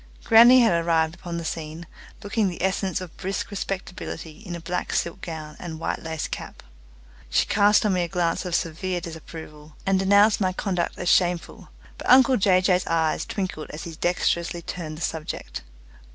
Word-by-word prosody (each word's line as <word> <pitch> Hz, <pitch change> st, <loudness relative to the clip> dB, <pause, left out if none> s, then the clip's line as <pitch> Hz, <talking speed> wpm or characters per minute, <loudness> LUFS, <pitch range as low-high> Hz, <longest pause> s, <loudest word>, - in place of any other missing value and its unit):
Grannie 240 Hz, +2 st, +8 dB
had 170 Hz, -8 st, +3 dB
arrived 160 Hz, -1 st, +2 dB
upon 175 Hz, -1 st, -6 dB
the 170 Hz, -, -5 dB
scene, 160 Hz, +1 st, -5 dB, 0.4 s
looking 205 Hz, 0 st, 0 dB
the 175 Hz, -, -6 dB
essence 190 Hz, 0 st, 0 dB
of 180 Hz, -3 st, -9 dB
brisk 195 Hz, +2 st, -3 dB
respectability 185 Hz, -4 st, -5 dB
in 190 Hz, -5 st, -7 dB
a -, -, -6 dB
black 180 Hz, +2 st, -3 dB
silk 170 Hz, +2 st, -1 dB
gown 155 Hz, -2 st, -7 dB
and 175 Hz, -2 st, -6 dB
a -, -, -7 dB
white 165 Hz, -, -3 dB
lace 160 Hz, -1 st, -4 dB
cap. -, -, -7 dB, 0.7 s
She -, -, +2 dB
cast 205 Hz, +1 st, +4 dB
on 205 Hz, -, +2 dB
me 180 Hz, -, +1 dB
a 175 Hz, -, -1 dB
glance 170 Hz, -2 st, 0 dB
of 180 Hz, -2 st, -2 dB
severe 175 Hz, +3 st, -2 dB
disapproval, 160 Hz, -2 st, -10 dB
and 195 Hz, -1 st, +2 dB
denounced 200 Hz, +3 st, +4 dB
my 185 Hz, -1 st, +1 dB
conduct 180 Hz, -3 st, -2 dB
as 180 Hz, -, -4 dB
shameful; 175 Hz, -2 st, +1 dB, 0.3 s
but -, -, -5 dB
uncle 260 Hz, 0 st, +7 dB
Jay 185 Hz, -2 st, +4 dB
Jay's 185 Hz, -1 st, +2 dB
eyes 160 Hz, -1 st, +1 dB
twinkled 185 Hz, -6 st, -4 dB
as 150 Hz, -, -7 dB
he 170 Hz, -, -6 dB
dexterously 170 Hz, +1 st, -1 dB
turned 155 Hz, -3 st, -6 dB
the -, -, -10 dB
subject. 160 Hz, -2 st, -4 dB
175 Hz, 180 wpm, -24 LUFS, 165-195 Hz, 0.7 s, Grannie